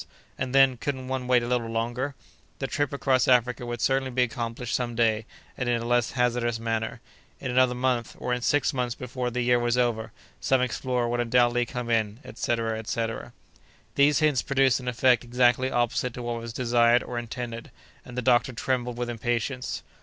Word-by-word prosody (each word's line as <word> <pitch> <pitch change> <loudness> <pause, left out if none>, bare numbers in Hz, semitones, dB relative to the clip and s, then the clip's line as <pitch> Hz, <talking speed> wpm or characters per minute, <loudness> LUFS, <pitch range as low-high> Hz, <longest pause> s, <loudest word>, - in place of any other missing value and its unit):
—And 130 +1 -3
then, 135 -2 +6
couldn't 130 0 -4
one 130 -1 -2
wait 125 -1 +4
a - - -3
little 120 -2 0
longer?—The 120 +4 -5
trip 145 +1 -1
across 135 -3 +1
Africa 125 -1 +2
would 120 -1 -4
certainly 135 0 +1
be 125 0 +2
accomplished 120 -1 -4
some 120 -2 -1
day, 115 -1 +1 0.3
and 125 -2 -2
in 120 -1 +2
a 115 - -5
less 120 0 +1
hazardous 120 -2 0
manner.—In 115 +2 -5
another 125 0 +3
month, 125 -2 -1
or 125 - -2
in 125 - -2
six 145 +4 +2
months 125 -2 -1
before 125 0 -4
the 125 +1 -2
year 120 0 +3
was 120 0 +1
over, 115 -2 0 0.3
some 130 - +2
explorer 125 0 -1
would 120 +1 -1
undoubtedly 120 0 +2
come 125 -1 -4
in—etc., 115 0 -1
etc. 115 0 -3 0.6
These 145 +1 +4
hints 150 -4 +3
produced 135 -2 +2
an 125 - -9
effect 125 0 +3
exactly 125 +1 +2
opposite 120 0 0
to 125 - -6
what 120 -1 -3
was 115 0 -6
desired 120 0 +3
or 120 -1 -4
intended, 120 0 -6 0.3
and 125 - -11
the 125 - -1
doctor 125 0 +3
trembled 125 0 -2
with 120 0 -2
impatience. 120 +2 -2
120 Hz, 180 wpm, -26 LUFS, 120-130 Hz, 0.6 s, then